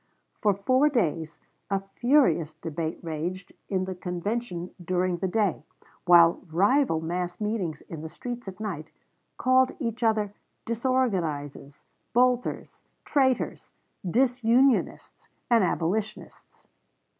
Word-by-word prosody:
For 205 Hz, -2 st, +3 dB
four 255 Hz, +9 st, +3 dB
days 165 Hz, -, -1 dB, 0.3 s
a 195 Hz, -1 st, +1 dB
furious 210 Hz, -, +3 dB
debate 160 Hz, 0 st, -4 dB
raged 170 Hz, +4 st, -4 dB, 0.2 s
in 185 Hz, -2 st, 0 dB
the 190 Hz, -, -4 dB
convention 180 Hz, +1 st, -4 dB
during 180 Hz, 0 st, 0 dB
the 190 Hz, -, -1 dB
day, 200 Hz, -2 st, 0 dB, 0.4 s
while 170 Hz, -1 st, +6 dB
rival 200 Hz, -, +2 dB
mass 175 Hz, +2 st, -3 dB
meetings 205 Hz, -8 st, -2 dB
in 160 Hz, -2 st, -9 dB
the 160 Hz, -, -6 dB
streets 245 Hz, +4 st, -7 dB
at 190 Hz, +1 st, -8 dB
night 175 Hz, -8 st, -5 dB, 0.5 s
called 255 Hz, 0 st, +3 dB
each 235 Hz, -3 st, -4 dB
other 215 Hz, -3 st, +1 dB, 0.3 s
"disorganizes," 185 Hz, -, -2 dB, 0.3 s
"bolters," 250 Hz, 0 st, +1 dB, 0.2 s
"traitors," 265 Hz, -3 st, 0 dB, 0.4 s
"disunionists," 250 Hz, +2 st, +2 dB, 0.2 s
and 230 Hz, -3 st, +5 dB
"abolitionists." 195 Hz, +5 st, -3 dB
195 Hz, 110 wpm, -27 LUFS, 170-240 Hz, 0.5 s, while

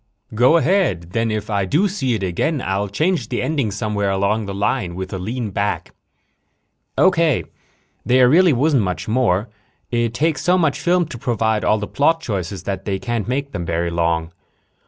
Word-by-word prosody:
"Go 125 Hz, +9 st, +5 dB
ahead. 160 Hz, -, +1 dB
Then 115 Hz, +3 st, 0 dB
if 110 Hz, -1 st, -3 dB
I 100 Hz, -2 st, +1 dB
do 160 Hz, -, +2 dB
see 135 Hz, -, -1 dB
it 100 Hz, -, -4 dB
again 135 Hz, -, -1 dB
I'll 100 Hz, -3 st, -1 dB
change 160 Hz, -, -1 dB
the -, -, -2 dB
ending 145 Hz, -8 st, 0 dB
somewhere 105 Hz, -1 st, -2 dB
along 100 Hz, +2 st, 0 dB
the -, -, -4 dB
line 100 Hz, -3 st, -1 dB
with 95 Hz, +1 st, -5 dB
a 95 Hz, -, -3 dB
lean 110 Hz, +3 st, -4 dB
back." 100 Hz, +2 st, -2 dB, 1.0 s
"Okay. 170 Hz, -6 st, +3 dB, 0.6 s
There 125 Hz, +2 st, +4 dB
really 175 Hz, +6 st, +5 dB
wasn't 140 Hz, 0 st, +2 dB
much 90 Hz, -3 st, -3 dB
more. 110 Hz, -3 st, +1 dB, 0.4 s
It 120 Hz, -1 st, 0 dB
takes 155 Hz, +4 st, 0 dB
so 180 Hz, +3 st, +3 dB
much 160 Hz, -5 st, +1 dB
film 175 Hz, 0 st, +2 dB
to 120 Hz, -, -9 dB
provide 110 Hz, -2 st, 0 dB
all 105 Hz, -, +3 dB
the 105 Hz, -, -3 dB
plot 160 Hz, +8 st, +1 dB
choices 100 Hz, -, -4 dB
that 95 Hz, -1 st, -4 dB
they 100 Hz, -2 st, -1 dB
can't 120 Hz, +1 st, -3 dB
make 140 Hz, +3 st, -2 dB
them 90 Hz, -9 st, -4 dB
very 85 Hz, 0 st, -1 dB
long. 85 Hz, -1 st, 0 dB
110 Hz, 180 wpm, -20 LUFS, 95-145 Hz, 1.0 s, Go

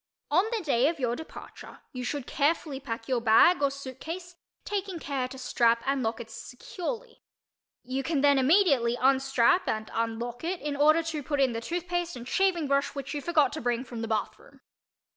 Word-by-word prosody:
On 365 Hz, -, +4 dB
the 450 Hz, -4 st, -2 dB
day 270 Hz, -4 st, +3 dB
of 325 Hz, -1 st, -2 dB
your 240 Hz, -2 st, 0 dB
departure 320 Hz, -, -11 dB
you 250 Hz, -1 st, -6 dB
should 280 Hz, +1 st, -3 dB
carefully 290 Hz, -1 st, 0 dB
pack 230 Hz, -4 st, -6 dB
your 255 Hz, -3 st, 0 dB
bag 235 Hz, +10 st, +5 dB
or 280 Hz, -, +3 dB
suitcase, 295 Hz, +7 st, -7 dB, 0.3 s
taking 390 Hz, -3 st, -3 dB
care 275 Hz, -5 st, -3 dB
to 265 Hz, +1 st, -10 dB
strap 235 Hz, -2 st, +2 dB
and 275 Hz, 0 st, 0 dB
lock 225 Hz, 0 st, -2 dB
it 225 Hz, -1 st, -9 dB
securely. 440 Hz, -, -7 dB, 0.6 s
You 260 Hz, +2 st, -2 dB
can 285 Hz, 0 st, -1 dB
then 285 Hz, -1 st, +5 dB
immediately 270 Hz, -6 st, +3 dB
unstrap 270 Hz, +4 st, +3 dB
and 215 Hz, 0 st, -3 dB
unlock 230 Hz, +2 st, -3 dB
it 350 Hz, +2 st, -2 dB
in 295 Hz, -1 st, -3 dB
order 310 Hz, +3 st, +4 dB
to 320 Hz, -2 st, -3 dB
put 290 Hz, +1 st, -2 dB
in 265 Hz, -3 st, +3 dB
the 230 Hz, -, -3 dB
tooth 345 Hz, +8 st, -4 dB
paste 350 Hz, 0 st, -2 dB
and 240 Hz, 0 st, -8 dB
shaving 355 Hz, -2 st, +1 dB
brush 280 Hz, +1 st, 0 dB
which 275 Hz, -1 st, -5 dB
you 290 Hz, -, -3 dB
forgot 300 Hz, -4 st, +2 dB
to 310 Hz, -, -5 dB
bring 240 Hz, 0 st, 0 dB
from 240 Hz, -3 st, -7 dB
the 225 Hz, -, -3 dB
bathroom. 220 Hz, -1 st, -4 dB
275 Hz, 195 wpm, -28 LUFS, 245-330 Hz, 0.6 s, bag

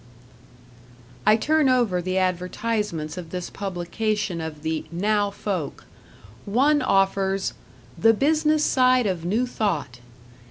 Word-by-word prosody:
I 215 Hz, -, +7 dB
turn 300 Hz, +4 st, +2 dB
over 235 Hz, -8 st, +2 dB
the 185 Hz, +1 st, -2 dB
advertisements 185 Hz, -2 st, -2 dB
of 170 Hz, -2 st, -9 dB
this 180 Hz, 0 st, -5 dB
publication 195 Hz, 0 st, -2 dB
of 155 Hz, -2 st, -7 dB
the 160 Hz, 0 st, -2 dB
"'Now' 205 Hz, +4 st, +1 dB
Folk". 195 Hz, -6 st, -4 dB, 0.6 s
One 280 Hz, +8 st, +3 dB
offers 195 Hz, -3 st, +1 dB, 0.5 s
"The 225 Hz, 0 st, +5 dB
Business 305 Hz, +3 st, +2 dB
Side 255 Hz, -2 st, +3 dB
of 180 Hz, -4 st, -2 dB
New 220 Hz, +8 st, +1 dB
Thought." 170 Hz, -, -2 dB
200 Hz, 115 wpm, -24 LUFS, 175-230 Hz, 0.6 s, I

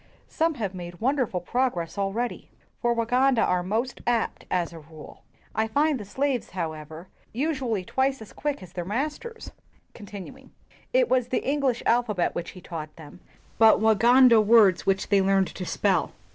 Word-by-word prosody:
Some 325 Hz, -1 st, 0 dB
have 205 Hz, -7 st, -3 dB
made 175 Hz, -1 st, -8 dB
wonderful 250 Hz, -6 st, 0 dB
progress 205 Hz, -5 st, -1 dB
al 195 Hz, -1 st, -1 dB
ready, 240 Hz, +4 st, -4 dB, 0.3 s
for 240 Hz, -, +2 dB
Waganda 245 Hz, +1 st, +2 dB
are 180 Hz, 0 st, +1 dB
most 225 Hz, +8 st, -2 dB
apt, 235 Hz, -2 st, -1 dB
as 175 Hz, -2 st, -1 dB
a 165 Hz, -, -9 dB
rule. 155 Hz, 0 st, -13 dB, 0.3 s
I 220 Hz, 0 st, 0 dB
find 290 Hz, +4 st, +1 dB
the 205 Hz, -, -7 dB
slaves, 265 Hz, +4 st, -2 dB
however, 160 Hz, -1 st, -6 dB, 0.3 s
usually 255 Hz, -, -1 dB
twice 265 Hz, +4 st, 0 dB
as 220 Hz, -, -12 dB
quick 290 Hz, -8 st, -3 dB
as 180 Hz, -1 st, -13 dB
their 175 Hz, -, -4 dB
masters." 300 Hz, -, -4 dB, 0.4 s
It 260 Hz, -, -5 dB
was 250 Hz, -2 st, +1 dB
the 255 Hz, -, -2 dB
English 275 Hz, -4 st, 0 dB
alphabet 225 Hz, -6 st, +1 dB
which 170 Hz, -, -4 dB
he -, -, -10 dB
taught 155 Hz, -3 st, -7 dB
them, 160 Hz, +2 st, -13 dB, 0.4 s
but 225 Hz, -1 st, +6 dB
Luganda 230 Hz, +2 st, +6 dB
words 210 Hz, -4 st, +5 dB
which 195 Hz, 0 st, +1 dB
they 200 Hz, -2 st, +4 dB
learned 195 Hz, 0 st, +2 dB
to 185 Hz, -, -6 dB
spell. -, -, 0 dB
220 Hz, 160 wpm, -25 LUFS, 185-260 Hz, 0.4 s, but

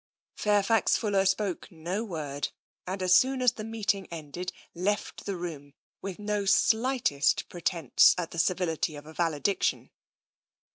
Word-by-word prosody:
Fairfax 210 Hz, +1 st, +3 dB
Fuller 200 Hz, -3 st, +1 dB
spoke 190 Hz, -1 st, -1 dB
no 175 Hz, +6 st, -3 dB
word, 150 Hz, -8 st, -4 dB, 0.4 s
and 190 Hz, +1 st, -3 dB
as 180 Hz, 0 st, +4 dB
soon 260 Hz, +4 st, +4 dB
as 250 Hz, -2 st, +4 dB
the 225 Hz, -3 st, -8 dB
meeting 210 Hz, -3 st, -1 dB
ended 165 Hz, +2 st, -6 dB, 0.2 s
left 195 Hz, +4 st, -2 dB
the 200 Hz, -, -1 dB
room 150 Hz, -5 st, -7 dB, 0.3 s
with 195 Hz, -2 st, -5 dB
no 210 Hz, -1 st, -1 dB
slightest 220 Hz, -, +2 dB
pretence 170 Hz, -5 st, +3 dB
at 175 Hz, -2 st, -3 dB
the 170 Hz, -, -4 dB
civility 165 Hz, -3 st, 0 dB
of 145 Hz, 0 st, -10 dB
a 155 Hz, -, -11 dB
valediction. 165 Hz, +3 st, 0 dB
185 Hz, 140 wpm, -28 LUFS, 165-210 Hz, 0.4 s, as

